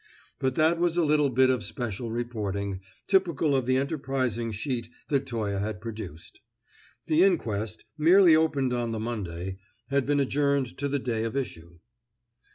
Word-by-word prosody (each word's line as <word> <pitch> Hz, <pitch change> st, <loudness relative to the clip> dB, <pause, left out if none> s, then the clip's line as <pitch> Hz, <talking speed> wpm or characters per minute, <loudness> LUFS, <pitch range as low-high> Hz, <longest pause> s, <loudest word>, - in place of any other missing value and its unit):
But 130 Hz, -2 st, 0 dB
that 160 Hz, +2 st, +3 dB
was 175 Hz, -1 st, +1 dB
a 175 Hz, -, +4 dB
little 150 Hz, -2 st, +3 dB
bit 130 Hz, +1 st, +4 dB
of 125 Hz, -4 st, -1 dB
special 120 Hz, -2 st, -4 dB
reporting, 105 Hz, -5 st, -3 dB, 0.3 s
typical 170 Hz, -7 st, +2 dB
of 130 Hz, -2 st, 0 dB
the 130 Hz, 0 st, +3 dB
enterprising 130 Hz, -5 st, -1 dB
sheet 115 Hz, +2 st, -3 dB, 0.2 s
that 140 Hz, -2 st, +1 dB
Toye 105 Hz, -5 st, -2 dB
had 105 Hz, -1 st, -3 dB
procured. 105 Hz, -7 st, -8 dB, 0.7 s
The 155 Hz, +2 st, +3 dB
inquest, 110 Hz, -, 0 dB, 0.2 s
merely 170 Hz, +1 st, +7 dB
opened 145 Hz, -5 st, +1 dB
on 120 Hz, -2 st, -1 dB
the 110 Hz, -, -3 dB
Monday, 95 Hz, -5 st, -4 dB, 0.3 s
had 140 Hz, -1 st, +1 dB
been 145 Hz, 0 st, +2 dB
adjourned 140 Hz, -2 st, +1 dB
to 140 Hz, -, 0 dB
the 140 Hz, 0 st, 0 dB
day 120 Hz, -4 st, -2 dB
of 115 Hz, +3 st, -2 dB
issue. 85 Hz, -10 st, -5 dB
125 Hz, 160 wpm, -27 LUFS, 110-145 Hz, 0.7 s, merely